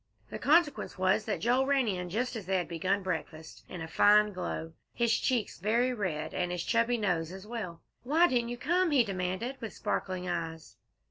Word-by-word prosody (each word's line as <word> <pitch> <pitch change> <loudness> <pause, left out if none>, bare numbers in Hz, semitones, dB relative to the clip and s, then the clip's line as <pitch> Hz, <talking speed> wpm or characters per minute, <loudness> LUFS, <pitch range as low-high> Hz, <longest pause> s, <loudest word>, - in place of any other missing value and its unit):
The - - -5
consequence 305 - +2
was 185 +3 +2
that - - -2
Joel 255 +3 +2
ran 275 -3 +2
in 180 -3 -2
just 240 +7 -2
as 210 -5 -6
they 190 0 +2
had 180 - -2
begun 185 +4 -1
breakfast, 160 -3 -5
in 175 -3 -6
a - - -6
fine 210 +4 +5
glow, 165 -3 -4 0.2
his 235 -1 +2
cheeks 245 -5 -1
very 235 +6 +2
red, 180 -9 -3
and 180 -1 -1
his 175 -1 -2
chubby 230 +1 +2
nose 175 -6 -1
as 190 +1 -9
well. 210 -7 -6 0.2
"Why 310 +7 +4
didn't 240 -5 0
you 240 - -4
come?" 345 +8 +2
he 280 -5 +4
demanded, 195 +5 -3
with 225 - -5
sparkling 185 -1 -2
eyes. 165 -2 -4
205 Hz, 195 wpm, -30 LUFS, 180-245 Hz, 0.2 s, fine